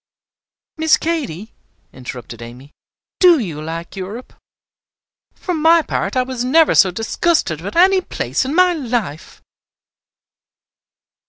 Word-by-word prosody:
"Miss 320 0 +3
Katy," 250 - -4 0.4
interrupted 125 -2 -9
Amy, 125 +5 -11 0.5
"do 355 -3 +6
you 170 - -4
like 165 +3 -7
Europe? 200 +6 -8 1.0
For 360 - -4
my 325 +1 +4
part, 265 - -3
I 255 - +3
was 255 -1 -4
never 310 +5 +4
so 190 - +5
disgusted 220 - -1
with 200 +4 -7
any 375 +2 +5
place - - -2
in 270 +4 -3
my 365 0 +4
life!" 235 - -4
245 Hz, 115 wpm, -18 LUFS, -, 1.0 s, do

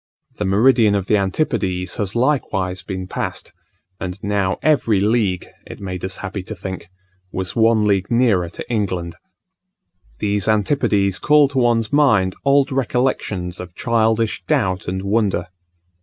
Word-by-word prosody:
The 105 - 0
meridian 110 +2 +4
of 100 -2 -1
the 105 - +3
Antipodes 95 - -1
has 100 -1 -3
likewise 105 -8 0
been 95 +1 -5
passed; - - -5 0.5
and 90 0 -5
now 100 -2 0
every 125 -9 +3
league, 100 -3 +1 0.2
it - - -9
made 90 -2 -6
us 95 0 -4
happy 95 +1 -4
to 110 +4 -7
think, 95 -2 -7 0.4
was 95 -1 -4
one 110 -1 +3
league 100 -2 +1
nearer 115 -8 +2
to - - -8
England. 95 -7 -2 1.0
These 100 - -1
Antipodes 105 -3 +1
call 150 -2 +4
to 135 -2 -1
one's 115 -2 +1
mind 110 -11 +3
old 140 0 +3
recollections 125 -8 -1
of 90 -1 -9
childish 115 -3 +1
doubt 95 -1 0
and 95 +1 -3
wonder. 100 -3 0
100 Hz, 140 wpm, -20 LUFS, 95-115 Hz, 1.0 s, meridian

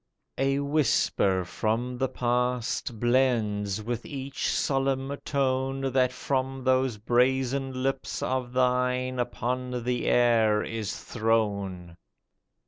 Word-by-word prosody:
A 135 0 +2
whisper 135 - +2
from 120 +6 -2
the 130 -1 +1
past 125 -2 -1
Blends 110 -5 +1
with 120 +1 -3
each 135 -3 -4
solemn 135 0 0
tone 135 -1 0
That 130 -1 +3
from 130 0 -2
those 130 -2 +2
brazen 130 +3 +1
lips 135 0 -2
of 125 -1 -1
thine 125 0 +1
Upon 125 0 -2
the 125 0 -1
air 115 -3 +4
is 110 -2 -4
thrown. 100 -6 -1
125 Hz, 105 wpm, -27 LUFS, 115-130 Hz, -, air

